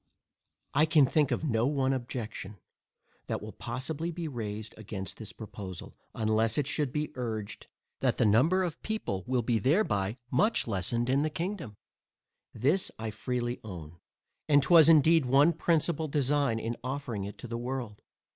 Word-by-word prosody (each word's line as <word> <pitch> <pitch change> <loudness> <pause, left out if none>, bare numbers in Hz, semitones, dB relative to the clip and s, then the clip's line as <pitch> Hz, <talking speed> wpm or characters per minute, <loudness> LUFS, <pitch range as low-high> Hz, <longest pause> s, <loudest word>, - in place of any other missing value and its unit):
I 150 +3 +4
can 150 -2 +6
think 145 +1 +2
of 125 +3 -1
no 120 -5 +1
one 135 -2 +1
objection, 115 -5 -5 0.7
that - - -2
will 105 +1 -8
possibly 140 +10 -4
be 170 -1 -4
raised 110 -5 -5
against 100 -3 -7
this 110 -1 -7
proposal, 100 -5 -8 0.2
unless 110 0 +1
it 145 - +2
should 145 -1 -1
be 150 +2 -2
urged, 110 -5 -5 0.3
that - - +1
the - - +3
number 145 - +4
of 170 -4 -4
people 215 - -3
will 125 -1 +1
be 115 -1 +1
thereby 110 - +1 0.2
much 210 - +2
lessened 115 +3 -1
in 135 +2 +2
the 155 - +1
kingdom. 170 - -4 0.8
This 145 - +1
I 110 0 -4
freely 120 +2 -3
own, 85 -5 -9 0.5
and 145 -2 +5
was 165 -2 +7
indeed 160 -2 +6
one 140 +6 +5
principal 165 -1 +1
design 140 -4 +1
in 115 +1 -3
offering 125 -6 -3
it 100 - -8
to - - -8
the 115 0 -4
world. 120 -4 -5
125 Hz, 160 wpm, -30 LUFS, 110-150 Hz, 0.8 s, was